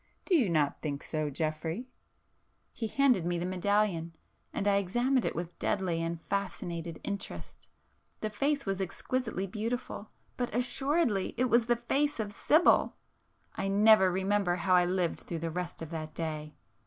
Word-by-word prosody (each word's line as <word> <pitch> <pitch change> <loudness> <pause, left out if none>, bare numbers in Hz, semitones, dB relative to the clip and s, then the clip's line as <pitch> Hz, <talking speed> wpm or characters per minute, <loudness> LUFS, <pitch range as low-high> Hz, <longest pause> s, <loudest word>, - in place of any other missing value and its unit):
Do 385 - 0
you 250 - +3
not 150 -4 +1
think 145 -2 -3
so, 155 -1 -2
Geoffrey?" 160 - -3 0.9
He 225 - -3
handed 255 -6 +3
me 175 0 0
the 170 - -2
medallion,—and 185 -1 -1
I 200 -1 +4
examined 240 +7 +1
it - - -1
with 170 +1 -5
deadly 180 -4 0
and 165 0 -2
fascinated 170 -3 -4
interest,—the 195 - -7
face 280 +6 0
was 195 -1 -1
exquisitely 220 +2 -2
beautiful,—but 225 +2 -5
assuredly 250 - +1
it 255 0 +1
was 235 -1 +4
the 240 - +4
face 275 +4 0
of 210 -2 -2
Sibyl! 310 - +4 0.6
I 195 - -2
never 200 -1 +6
remember 190 0 +1
how 185 +1 +1
I 180 -1 +6
lived 180 -1 0
through 170 - -5
the 165 0 -3
rest 175 -1 -4
of 165 - -8
that 155 -1 -5
day. 155 -2 -4
190 Hz, 150 wpm, -30 LUFS, 165-230 Hz, 0.9 s, never